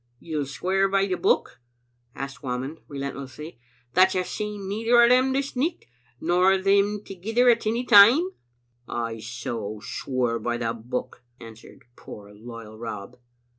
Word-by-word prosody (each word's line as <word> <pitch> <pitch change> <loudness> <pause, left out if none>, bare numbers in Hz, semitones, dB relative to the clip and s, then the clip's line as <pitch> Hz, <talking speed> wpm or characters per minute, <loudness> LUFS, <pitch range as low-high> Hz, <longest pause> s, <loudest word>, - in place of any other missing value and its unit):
"You'll 150 -4 -3
swear 190 +7 0
by 195 0 +2
the 190 - -2
Book," 175 - 0 0.5
asked 135 -2 -7
Whamond, 130 +4 -4
re 140 - -8
lentlessly, 140 +1 -7 0.3
"that 185 +4 +5
you've 185 0 0
seen 210 -1 -5
neither 225 +4 +2
o' 235 - +8
them 255 +2 +4
this 275 +1 -2
nicht, 315 +7 -1 0.3
nor 180 +3 +3
them 200 +2 +2
thegither 220 +6 0
at 230 -2 0
any 235 +3 0
time?" 245 - +7 0.3
" 120 0 -43 0.2
I 115 0 -7
so 115 -2 -5
swear 120 +1 -2
by 120 0 -2
the 115 -1 -2
Book," 120 +3 -6 0.2
answered 115 -1 -13
poor 105 0 -12
loyal 110 0 -11
Rob. 115 +1 -7
160 Hz, 150 wpm, -25 LUFS, -, 0.5 s, o